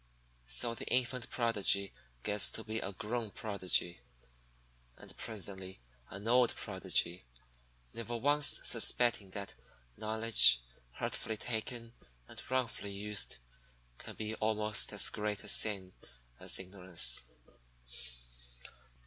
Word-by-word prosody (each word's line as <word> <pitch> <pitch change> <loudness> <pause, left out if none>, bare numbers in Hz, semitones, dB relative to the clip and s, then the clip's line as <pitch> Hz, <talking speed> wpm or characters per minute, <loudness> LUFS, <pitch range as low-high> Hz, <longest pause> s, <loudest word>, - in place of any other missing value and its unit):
So - - +1
the - - -7
infant 125 0 +1
Prodigy 100 -4 +2 0.3
gets 105 -1 +2
to 110 - -3
be 110 0 -2
a 95 - -3
grown 110 +3 -3
Prodigy, 95 - 0 1.0
and - - -12
presently 95 - -6 0.3
an 100 +3 -7
old 125 0 +4
Prodigy, 85 -8 0 0.7
never 115 +1 -4
once 145 +2 +5
suspecting 120 -3 +2
that 100 +1 -6 0.4
knowledge, 110 - +5 0.3
hurtfully 110 - -3
taken 115 +1 -4 0.3
and - - -10
wrongfully 125 -5 -1
used, 105 +1 -1 0.6
can - - -9
be 110 0 -3
almost 110 -1 0
as 100 -1 +3
great 105 -1 -3
a - - -8
sin 95 -4 +1 0.5
as - - 0
ignorance. 90 -10 +1
105 Hz, 105 wpm, -34 LUFS, 100-115 Hz, 1.0 s, once